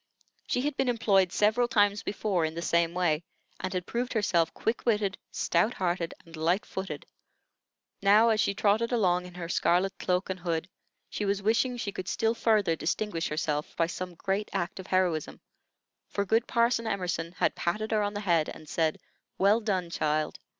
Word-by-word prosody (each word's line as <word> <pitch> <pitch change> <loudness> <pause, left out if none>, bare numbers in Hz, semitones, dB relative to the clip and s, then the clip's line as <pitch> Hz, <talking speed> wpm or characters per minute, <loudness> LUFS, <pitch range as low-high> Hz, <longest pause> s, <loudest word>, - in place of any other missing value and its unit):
She 250 - 0
had 295 +1 -1
been 270 -2 +1
employed 200 -6 +3
several 220 +4 +3
times 205 -3 +3
before 200 -4 -1
in 160 0 -2
the 170 - -3
same 170 0 +1
way, 170 -4 +1 0.4
and 185 - -3
had 180 -2 -2
proved 245 +4 -2
herself 175 -7 +2
quick 225 +2 -2
witted, 210 -4 +1 0.2
stout 225 +3 +1
hearted, 175 -2 -1
and 165 0 -12
light 170 +5 +1
footed. 190 0 -5 1.0
Now, 210 +4 +6
as 220 -1 +2
she 200 - +1
trotted 215 +4 +2
along 180 -6 +2
in 180 - -13
her 175 -1 -5
scarlet 180 +3 +2
cloak 180 +1 0
and 185 - -5
hood, 170 -1 -2 0.4
she - - -4
was 200 0 0
wishing 235 +4 +2
she 210 -4 -3
could 185 -2 -6
still 225 -1 +1
further 215 -7 +2
distinguish 165 +2 -1
herself 150 -1 -2
by 165 - +2
some 180 +1 -5
great 195 +4 -2
act 190 -1 -2
of 190 - -8
heroism; 180 -5 0 0.7
for 200 - -2
good 225 +4 +2
Parson 235 -1 +2
Emerson 180 -5 -2
had - - +1
patted 215 +6 -2
her 215 -1 +2
on 205 0 -2
the 205 - -3
head 170 -6 +2
and 155 - -10
said, 160 0 0 0.4
"Well 200 +4 +4
done, 185 -6 -1
child!" 155 -1 -1
195 Hz, 185 wpm, -28 LUFS, 170-215 Hz, 1.0 s, Now